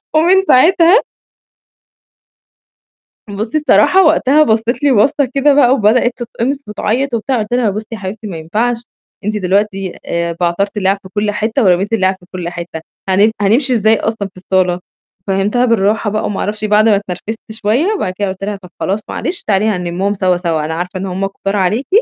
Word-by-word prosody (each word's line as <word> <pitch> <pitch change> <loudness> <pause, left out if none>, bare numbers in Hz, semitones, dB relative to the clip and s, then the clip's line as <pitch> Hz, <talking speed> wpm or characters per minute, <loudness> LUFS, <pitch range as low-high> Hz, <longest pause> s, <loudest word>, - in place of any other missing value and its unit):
ومن 355 +5 +4
ساعتها 340 - +5 2.3
بُصِّي 215 +7 -3
الصراحة، 300 - +4
وقتها 305 -1 +4
بصِّت 230 +3 0
لي 285 - +4
بصَّة 270 +5 +3
كده 280 +1 +3
بقى 275 -3 +4
وبدأت 240 0 +3
تتقمِص 245 +2 -3
وتعيط 240 +5 -2
وبتاع، 235 +2 -1
قُلت 210 +2 -4
لها 245 -3 +2
بُصِّي 215 +2 -5
يا 225 - -5
حبيبتي 210 +2 -6
ما 180 -5 -6
ينفعش 230 +9 -2 0.4
أنتِ 210 0 -1
دلوقتي 195 0 -1
آآ، 170 0 -2
بعترتي 190 +4 -1
الِلعَب 195 0 +1
في 190 - -12
كُلّ 210 0 0
حِتَّة 220 +5 -1
ورميتِ 190 +2 +2
الِلعَب 190 -3 +2
في 180 - -19
كُلّ 180 -2 -4
حِتَّة، 170 -2 -7 0.3
هن 200 +4 +4
هنمشي 250 +7 +2
إزاي 220 -1 +3
أصلًا 220 -2 -2
في - - -20
الصالة؟! 185 -1 0 0.5
فهّمتها 200 +6 +1
بالراحة 215 -2 +1
بقى 215 +1 -2
وما 205 - -3
أعرفش 215 +1 -3
بعد 215 +1 +4
ما 210 - +5
اتنرفزت 205 +3 -5
شوية، 230 - 0
وبعد 185 - -2
كده 205 - -1
قُلت 190 +1 -6
لها 205 +1 -2
طَب 190 -2 -13
خلاص 195 +3 -1
معلش، 355 - -4
تعالي 200 0 +1
هنلِمُّهم 185 -1 -1
سوا، 185 -3 +1
سوا. 165 -4 -1
أنا 160 - -3
عارفة 180 +3 -4
إن 190 - -4
هم 190 +1 -2
كُتار 195 0 -4
عليكِ 205 +7 0
210 Hz, 180 wpm, -15 LUFS, 190-240 Hz, 2.3 s, ساعتها